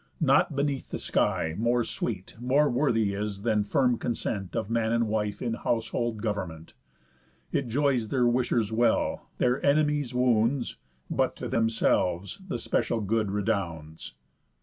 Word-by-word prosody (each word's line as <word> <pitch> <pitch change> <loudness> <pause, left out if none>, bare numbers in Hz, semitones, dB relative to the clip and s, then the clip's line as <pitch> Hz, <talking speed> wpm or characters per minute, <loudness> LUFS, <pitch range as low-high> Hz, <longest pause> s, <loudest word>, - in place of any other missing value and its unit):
Nought 145 -1 +3
beneath 140 -1 -1
the - - -3
sky 80 - 0
More 120 +1 +2
sweet, 100 -5 -4
more 140 +4 +3
worthy 115 -6 +1
is, 100 0 -4
than 110 -3 +2
firm 125 +2 +2
consent 110 -5 -3
Of 110 - -1
man 115 0 0
and 115 -1 +2
wife 105 -1 -2
in 120 -2 -1
household 115 -1 -2
government. 90 -7 -4 0.8
It 135 - 0
joys 130 -2 +1
their 125 +1 +1
wishers 120 -3 +1
well, 120 +2 +1
their 125 +1 +1
enemies 145 -2 +2
wounds, 125 0 +1 0.3
But - - +1
to - - -5
themselves 110 - +1
the 165 - -2
special 115 0 0
good 110 0 0
redounds." 85 -8 -3
115 Hz, 140 wpm, -27 LUFS, 105-125 Hz, 0.8 s, Nought